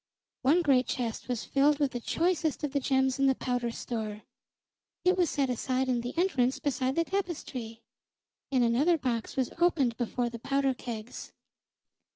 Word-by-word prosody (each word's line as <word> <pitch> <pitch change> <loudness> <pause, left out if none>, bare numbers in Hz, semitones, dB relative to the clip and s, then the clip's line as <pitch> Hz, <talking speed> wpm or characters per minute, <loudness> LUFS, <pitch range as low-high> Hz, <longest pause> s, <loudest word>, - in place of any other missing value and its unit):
One 310 +7 +4
great 260 -4 +3
chest 235 -4 -3
was 245 -3 -2
filled 285 +2 +3
with 285 -2 +1
the 245 - -3
choicest 325 +3 0
of 295 - -1
the 285 - +1
gems 265 0 +1
in 275 - +4
the 265 - +3
powder 245 -2 -1
store; 220 -3 -5 0.8
it 365 +1 +5
was 355 -4 +2
set 275 -2 +1
aside 255 +1 -1
in 245 -2 +1
the 245 +6 -6
entrance 270 -8 +2
beside 265 -3 -1
the 335 - +3
tapestry, 280 - -4 0.7
and 255 -2 +3
another 275 +9 +3
box 245 -5 -2
was 260 -2 0
opened 300 -9 +3
before 240 0 -1
the 235 - -7
powder 275 +2 +1
kegs. 235 -2 -7
265 Hz, 170 wpm, -29 LUFS, 245-290 Hz, 0.8 s, it